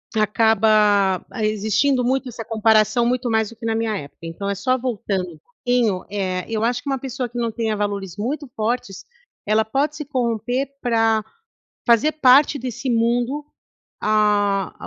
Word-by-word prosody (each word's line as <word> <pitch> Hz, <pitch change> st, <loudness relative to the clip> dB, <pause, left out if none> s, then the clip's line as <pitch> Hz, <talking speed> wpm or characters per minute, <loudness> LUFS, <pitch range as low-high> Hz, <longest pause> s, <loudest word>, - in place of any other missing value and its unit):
acaba 210 Hz, -3 st, +3 dB, 0.2 s
existindo 215 Hz, +5 st, +1 dB
muito 260 Hz, +2 st, 0 dB
essa 230 Hz, -1 st, -7 dB
comparação 220 Hz, +1 st, +3 dB
muito 250 Hz, +1 st, 0 dB
mais 220 Hz, -1 st, +1 dB
do 230 Hz, -, -13 dB
que 230 Hz, +1 st, -9 dB
na 225 Hz, -1 st, 0 dB
minha 225 Hz, -2 st, -1 dB
época. 145 Hz, -1 st, -10 dB
Então 165 Hz, +4 st, -5 dB
é -, -, 0 dB
só 255 Hz, +7 st, 0 dB
voltando 195 Hz, -9 st, -3 dB, 0.3 s
em 245 Hz, -2 st, +3 dB
um 185 Hz, -2 st, -3 dB
eh, 185 Hz, -3 st, -2 dB
eu 220 Hz, -1 st, -1 dB
acho 245 Hz, +1 st, -1 dB
que 285 Hz, -, -4 dB
uma 270 Hz, -1 st, -1 dB
pessoa 260 Hz, -1 st, -4 dB
que 240 Hz, -, -8 dB
não 235 Hz, -1 st, 0 dB
tenha 220 Hz, -1 st, -2 dB
valores 200 Hz, -3 st, -3 dB
muito 270 Hz, +8 st, -3 dB
fortes, 220 Hz, -3 st, -2 dB, 0.4 s
ela 215 Hz, +1 st, +3 dB
pode 280 Hz, +7 st, -1 dB
se 300 Hz, -, -5 dB
corromper 245 Hz, 0 st, -1 dB
pra 225 Hz, -2 st, +2 dB, 0.6 s
fazer 240 Hz, +7 st, +4 dB
parte 285 Hz, 0 st, +5 dB
desse 255 Hz, +1 st, -5 dB
mundo, 240 Hz, +4 st, 0 dB, 0.6 s
ah 205 Hz, -2 st, +2 dB
225 Hz, 160 wpm, -21 LUFS, 210-250 Hz, 0.6 s, parte